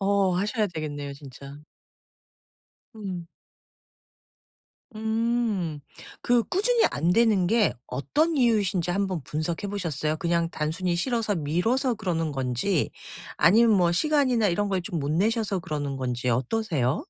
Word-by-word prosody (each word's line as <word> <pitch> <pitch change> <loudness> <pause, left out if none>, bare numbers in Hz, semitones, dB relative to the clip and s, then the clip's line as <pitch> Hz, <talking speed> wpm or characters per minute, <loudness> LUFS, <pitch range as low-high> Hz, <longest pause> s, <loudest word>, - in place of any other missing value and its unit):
어 195 -1 +2
하셔야 210 +3 0
되겠네요 145 -5 -5
진짜. 140 +1 -11 1.3
음. 185 -6 -6 1.7
음. 220 -7 -1 0.4
그 240 -1 +3
꾸준히 450 +5 +2
안 165 +5 +1
되는 220 -5 +3
게 220 +2 +3
어떤 290 - 0
이유이신지 200 - +2
1 195 +3 +1
번 185 -4 -3
분석해 155 +7 -3
보셨어요? 155 -6 -2
그냥 170 0 0
단순히 170 +4 -2
싫어서 225 +1 0
미뤄서 225 - 0
그러는 175 -7 -2
건지 135 +6 -1 0.5
아니면 220 +1 +5
뭐 175 -2 +3
시간이나 260 - +2
이런 205 +4 0
걸 190 -2 0
좀 175 -3 -4
못 140 +1 -2
내셔서 205 +4 +1
그러는 145 -4 -4
건지 125 -1 -2
어떠세요? 135 - 0
185 Hz, 265 characters per minute, -26 LUFS, 155-220 Hz, 1.7 s, 아니면